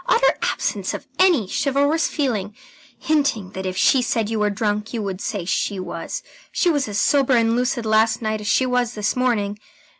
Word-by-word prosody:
Utter - - +4
absence - - -1
of - - -8
any 350 - +4
chivalrous 285 - +1
feeling 215 - -2 0.4
hinting 280 -11 0
that 190 0 -5
if 185 0 -4
she 260 +6 +4
said 225 -3 -1
you 220 - -1
were 210 0 +2
drunk, 210 +2 -2
you 225 - -2
would 195 -1 -4
say 200 -6 -3
she 195 +2 -1
was. 185 - -5 0.3
She 350 - +2
was 290 -5 0
as 205 0 -2
sober 275 -2 +3
and 230 -1 +3
lucid 245 -1 -1
last 220 +1 +3
night 215 -1 -2
as 210 - -6
she 260 - +3
was 245 -2 0
this 210 -1 -1
morning. 215 -5 0
225 Hz, 190 wpm, -21 LUFS, 205-260 Hz, 0.4 s, Utter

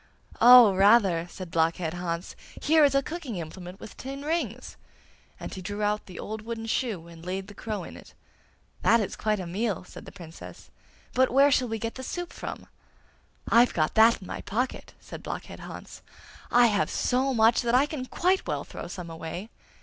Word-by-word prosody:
'Oh, 240 -3 +9
rather!' 195 -4 +4
said 185 -2 -9
Blockhead 165 0 0
Hans. 175 -1 -4 0.2
'Here 315 +1 +4
is 280 -1 +4
a 275 - +3
cooking 310 -8 -6
implement 180 +2 -8
with - - -11
tin 275 +2 -7
rings,' 280 - -3 0.6
and - - -7
he 190 - -7
drew 205 +3 -4
out 210 +1 -1
the 185 - -10
old 220 0 -5
wooden 225 0 -5
shoe, 220 -7 -2
and 165 -1 -13
laid 190 +2 -4
the 205 - -11
crow 215 0 -5
in - - -10
it. - - -14 0.7
'That 230 - +5
is 210 - -3
quite 215 -1 -1
a 185 - -4
meal!' 200 +3 -2
said - - -12
the - - -10
Princess; 170 -4 -12 0.4
'but 260 +1 +3
where 275 +3 +5
shall 255 -2 +2
we 225 -1 -3
get 230 +1 -4
the 260 - -8
soup 350 +6 -5
from?' - - -7 0.8
'I've 240 +1 +4
got 155 -2 +1
that 225 0 +5
in - - -10
my - - -5
pocket!' 250 +5 -3
said - - -10
Blockhead - - -7
Hans. - - -10 0.5
'I 245 0 +6
have 205 -3 +2
so 260 +2 +1
much 225 -2 +4
that 240 0 +1
I 265 +3 +5
can 290 -4 -6
quite 370 +6 +1
well - - -2
throw - - -8
some 175 -3 -7
away! 165 +6 -7
220 Hz, 195 wpm, -27 LUFS, 185-250 Hz, 0.8 s, Oh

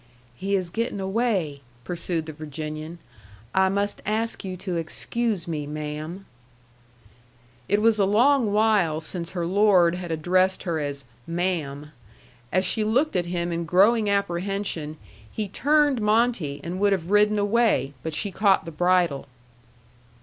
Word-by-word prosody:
"He 195 +8 -1
is 185 -3 -2
getting 230 0 -2
away," 190 - -1 0.2
pursued 170 +1 -3
the 155 - -7
Virginian. 155 +2 -6 0.6
"I 190 0 +4
must 200 +1 -1
ask 225 +2 -2
you 185 -1 -5
to 185 0 -4
excuse 195 +4 -2
me, 150 -3 -3
ma'am." 155 +5 -6 1.4
It 205 +2 +2
was 225 -1 +4
a 200 - +4
long 235 +3 +3
while 205 -7 +2
since 170 +2 -5
her 175 -2 -2
lord 185 -2 +4
had 180 -1 -5
addressed 185 +4 +1
her 170 -4 -1
as 140 -2 -4 0.2
"ma'am." 165 -4 -2 0.6
As 185 0 +2
she 215 +4 +1
looked 250 +7 +1
at 175 -1 0
him 175 0 -2
in 170 0 -2
growing 205 +6 +4
apprehension, 195 -5 -2 0.3
he 215 -2 -3
turned 290 +4 +2
Monte 210 -9 +1
and 175 +2 -4
would 200 0 +3
have 180 -1 -3
ridden 210 +1 +4
away, 205 - +2
but 160 -1 -4
she 200 +3 -2
caught 195 0 +3
the 165 - -6
bridle. 175 -4 +1
185 Hz, 145 wpm, -25 LUFS, 165-210 Hz, 1.4 s, I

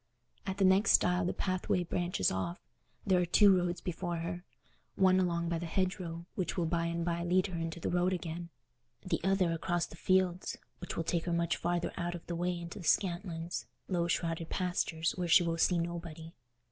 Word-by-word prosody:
At 190 0 -2
the 195 - +3
next 190 +3 +5
stile 180 0 +4
the 180 - +1
pathway 185 -1 -1
branches 175 - 0
off: 95 - -3 0.5
there 185 -3 +3
are - - +2
two 200 +2 +6
roads 175 -1 -1
before 175 0 -3
her—one 175 +2 -1
along 170 -2 0
by 170 -1 -1
the 170 - -4
hedgerow, 175 -2 -2
which 185 -1 -2
will 175 - +1
by 170 0 0
and 170 0 -2
by 170 0 -1
lead 180 +2 +2
her 180 -4 -4
into 165 0 -4
the - - -2
road 180 +1 +2
again, 170 -1 -4 0.6
the 185 - -1
other 190 -2 +2
across 175 +1 0
the - - -12
fields, 185 0 +1 0.2
which 180 - -6
will 165 - 0
take 165 0 -1
her 175 - -1
much 170 0 +1
farther 175 0 -1
out 175 0 -2
of 170 - -9
the 170 - -4
way 175 +1 -1
into 170 +4 -7
the 175 - -8
Scantlands, 175 -2 0 0.2
low 175 -2 0
shrouded 165 -1 -1
pastures 170 -3 0
where 180 -1 -1
she 175 +2 +6
will 165 -1 -1
see 175 +1 +3
nobody. 170 -1 -5
175 Hz, 195 wpm, -32 LUFS, 170-180 Hz, 0.6 s, two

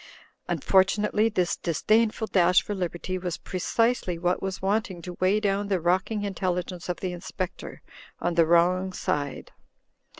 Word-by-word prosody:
Unfortunately 210 +3 +2
this 180 -5 0
disdainful 215 +7 +1
dash 180 -3 +4
for 210 - -4
liberty 185 0 -3
was 180 -2 -3
precisely 190 0 0
what 180 +1 0
was 190 -1 -3
wanting 195 -2 -1
to 180 - -6
weigh 190 +3 +3
down 200 -1 0
the 195 -2 +1
rock 180 +3 +1
ing 215 -2 -2
intelligence 180 -2 -3
of 180 - -3
the 185 -1 -2
Inspector 180 +1 -6 0.4
on 175 - -1
the 165 -1 +4
wrong 180 +3 +3
side. 145 -5 -3
185 Hz, 145 wpm, -26 LUFS, 175-200 Hz, 0.4 s, dash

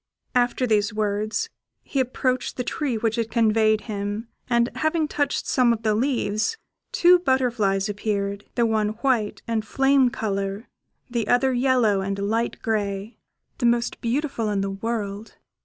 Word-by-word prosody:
After 245 +1 +2
these 210 -3 +2
words, 210 0 -1 0.3
he 275 - -2
approached 255 0 -1
the 250 - -1
tree 265 -3 -2
which 225 +1 0
had 230 -1 -1
conveyed 220 -1 +3
him, 205 +1 -4 0.2
and 235 -1 +3
having 315 0 +1
touched 290 -1 -1
some 250 -2 +3
of 230 -1 -2
the 215 -1 +2
leaves, 230 - 0 0.3
two 355 +1 +6
butterflies 235 - +1
appeared, 200 -1 -2
the 235 - +3
one 215 -2 +1
white 240 -6 +1
and 225 -2 0
flame 270 +3 +3
colour, 200 -1 -3 0.4
the 235 -4 -2
other 260 +2 +3
yellow 245 -6 +3
and 195 +1 -2
light 220 +4 -1
grey 205 0 -2 0.4
the 240 - +3
most 235 0 0
beautiful 240 -2 -1
in 200 -1 0
the 195 0 -2
world. 210 0 -4
225 Hz, 150 wpm, -24 LUFS, 205-250 Hz, 0.4 s, two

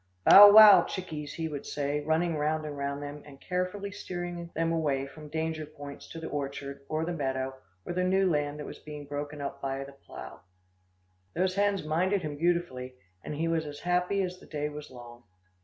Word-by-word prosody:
"Bow, 205 +1 +11
wow! 215 -1 +10
chickies," 155 -6 -6
he 165 -1 -2
would 145 -3 -5
say, 145 0 -2
running 160 +2 +1
round 155 +1 -1
and 150 -1 -5
round 140 0 -3
them, 145 +1 -7
and 140 -2 -14
carefully 185 +4 -3
steering 175 -3 -6
them 165 +1 0
away 145 -5 0
from 150 +2 -11
danger 160 0 -2
points 145 -2 -10
to 165 - -8
the 160 - -7
orchard 140 -1 -5
or 155 +1 -1
the 175 - -2
meadow, 135 -3 -2 0.3
or - - -4
the 180 +1 0
new 190 +1 +3
land 145 -3 0
that 150 - -6
was - - -9
being 150 -1 -9
broken 145 +1 -5
up 140 0 -5
by 135 0 -2
a 135 0 -7
plough. 140 - -11 1.0
Those 185 +2 +1
hens 200 -1 +1
minded 180 +5 +1
him 150 -1 -4
beautifully, 150 -6 -1 0.3
and 150 - -5
he 165 +3 -1
was 165 -2 0
as 145 0 -8
happy 180 +3 +1
as 180 0 -5
the - - -16
day 150 -1 -3
was 150 0 -9
long. 120 -1 -12
155 Hz, 200 wpm, -29 LUFS, 145-175 Hz, 1.0 s, Bow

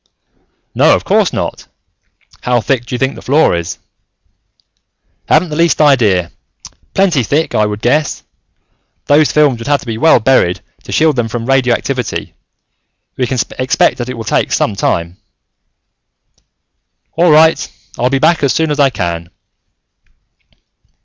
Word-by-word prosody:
"No, - - +4
of - - -4
course - - +2
not. - - -5 0.7
How 125 -1 +1
thick 120 +1 -2
do 125 - -4
you - - -2
think 135 +2 -1
the - - -11
floor 145 - +2
is?" 85 -1 -4 1.5
"Haven't 180 - +3
the 150 - -5
least 170 +1 +1
idea. 110 - +2 0.6
Plenty 185 -8 +2
thick, 145 +8 -1
I 105 0 +2
would 105 0 -6
guess. 150 +5 0 0.8
Those 150 +1 +3
films 145 -5 +2
would 115 - -8
have 145 -1 +1
to - - -13
be 115 -2 -5
well 160 -4 +5
buried, 110 -7 +1 0.2
to - - -9
shield 155 -3 +2
them 120 -2 0
from 115 +1 -5
radioactivity. 130 -1 -1 0.8
We 125 - -1
can 130 - -3 0.2
expect 130 0 +1
that 120 +1 -4
it 130 - -5
will 115 - -5
take - - -1
some 105 - 0
time." 85 -2 -2 2.0
"All 170 +1 +2
right. 160 +1 +4 0.3
I'll 125 - +1
be 135 - +1
back 160 +4 +2
as 140 -2 +2
soon 160 -1 0
as 145 - -2
I 140 -1 +4
can." 85 -7 -4
130 Hz, 150 wpm, -14 LUFS, 115-150 Hz, 2.0 s, well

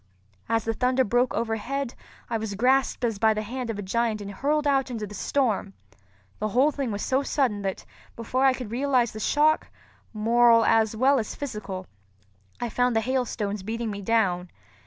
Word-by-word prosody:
As 225 0 +1
the 225 - 0
thunder 255 +3 +2
broke 245 +3 +1
overhead, 235 +4 -2 0.3
I 230 -1 -2
was 215 -2 -4
grasped 255 +3 +2
as 225 -4 -2
by 220 0 +4
the 215 - -2
hand 245 +2 -5
of 225 - -3
a 205 - -4
giant 225 +2 0
and 200 -1 -6
hurled 295 +8 0
out 270 -2 +2
into 225 -4 -4
the 205 - -10
storm. 210 -3 -1 0.6
The 215 - 0
whole 255 +8 +3
thing 275 -3 -3
was 205 0 -3
so 265 +1 +2
sudden 255 -7 0
that, 195 -1 -4 0.3
before 250 +3 -1
I 265 - +5
could 250 -4 -7
realize 250 -1 +1
the 215 - -8
shock, 305 +7 +2 0.4
moral 230 +1 +4
as 220 -1 +3
well 265 +4 +4
as 215 - -4
physical, 210 -9 -5 0.7
I 240 - -2
found 245 +1 +1
the 225 - +3
hailstones 220 -5 -2
beating 225 +2 -3
me 200 0 -6
down. 190 -5 +1
230 Hz, 185 wpm, -26 LUFS, 215-260 Hz, 0.7 s, I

